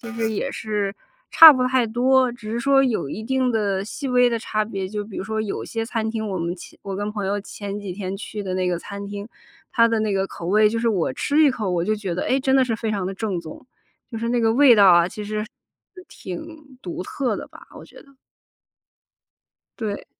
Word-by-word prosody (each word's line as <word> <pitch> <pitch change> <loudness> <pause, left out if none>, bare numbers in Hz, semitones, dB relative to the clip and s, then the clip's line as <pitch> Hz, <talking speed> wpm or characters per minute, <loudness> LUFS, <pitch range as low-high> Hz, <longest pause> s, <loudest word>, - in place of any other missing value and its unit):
其 235 -1 -8
实 225 -1 -1
也 205 - -2
是 210 -3 -2 0.4
差 325 -1 +11
不 255 -2 0
太 255 -2 +2
多， 255 +3 +3
只 230 -3 -9
是 230 - -2
说 270 +2 +4
有 230 - 0
一 215 - -6
定 255 +1 0
的 200 -3 0
细 270 +6 -5
微 250 0 +4
的 235 - -1
差 215 -1 -2
别。 195 -3 -5
就 210 +1 -4
比 205 -1 -10
如 - - -3
说 220 +2 -3
有 215 -2 -4
些 225 0 -4
餐 220 -2 -2
厅， 220 -1 -3
我 190 - -3
们 170 +1 -2
前 - - -13
我 195 -1 -5
跟 205 +1 -3
朋 205 -2 -4
友 200 +1 -1
前 200 0 -7
几 200 -3 -6
天 190 0 -5
去 210 +1 -6
的 185 -2 -4
那 185 0 0
个 180 -1 0
餐 200 +1 -7
厅， 205 +1 -7 0.4
它 230 -1 +4
的 230 -1 0
那 215 -2 0
个 195 0 0
口 170 - -8
味 210 +3 +4
就 230 +1 -2
是 230 - +1
我 180 - 0
吃 290 - +1
一 305 - +6
口， 215 -7 -3
我 175 -1 0
就 215 - +1
觉 200 -4 -4
得： - - -1
“诶， 265 - +1
真 265 0 +2
的 265 - +4
是 230 -3 -1
非 220 0 -3
常 195 -3 -2
地 195 - -4
正 195 -3 -3
宗。” 160 -2 -11 0.5
就 225 - -5
是 230 - -2
那 245 0 +1
个 225 -1 +3
味 255 0 +7
道 200 -2 +6
啊， 175 -1 +5
其 210 +3 -7
实 215 +1 -3 0.6
挺 290 - -9
独 175 -1 -6
特 260 +5 -2
的 - - -7
吧， - - -15
我 - - -11
觉 - - -16
得。 280 - -24 1.7
对。 215 -4 -4
215 Hz, 260 characters per minute, -22 LUFS, 195-240 Hz, 1.7 s, 差